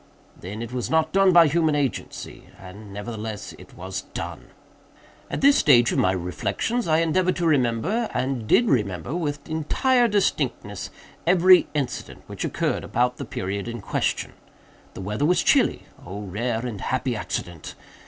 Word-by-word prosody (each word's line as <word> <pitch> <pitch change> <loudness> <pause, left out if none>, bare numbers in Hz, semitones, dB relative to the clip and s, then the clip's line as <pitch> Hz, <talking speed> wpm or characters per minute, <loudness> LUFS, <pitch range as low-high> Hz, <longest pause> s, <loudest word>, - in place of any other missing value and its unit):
Then 105 +5 -7
it 115 +1 -8
was 125 -1 -3
not 160 -1 +2
done 195 -1 +5
by 170 -1 +7
human 155 0 +2
agency. 140 -4 -4
And 100 +2 -11
nevertheless 105 0 -6
it - - -15
was 95 +1 -5
done. - - -6 0.8
"At - - -3
this 280 +1 +6
stage 120 -5 +5
of - - 0
my 90 - +3
reflections 95 - -2
I 160 0 +3
endeavored 180 +3 +1
to 175 - -1
remember, 155 - +1
and 130 -4 -2
did 240 - +4
remember, 105 - 0
with 150 -4 -3
entire 240 - +2
distinctness, 205 -3 -1 0.4
every 180 0 +6
incident 140 -4 -4
which - - -6
occurred - - -1
about 125 +1 0
the - - -5
period 100 +3 -4
in 120 0 -5
question. - - -2 0.6
The - - -7
weather 105 +8 -3
was 180 +4 +3
chilly - - +3 0.2
(oh 100 +3 -7
rare 110 +5 -2
and 110 -5 -5
happy 130 -1 -1
accident!) 85 -5 -5
125 Hz, 155 wpm, -24 LUFS, 105-165 Hz, 0.8 s, by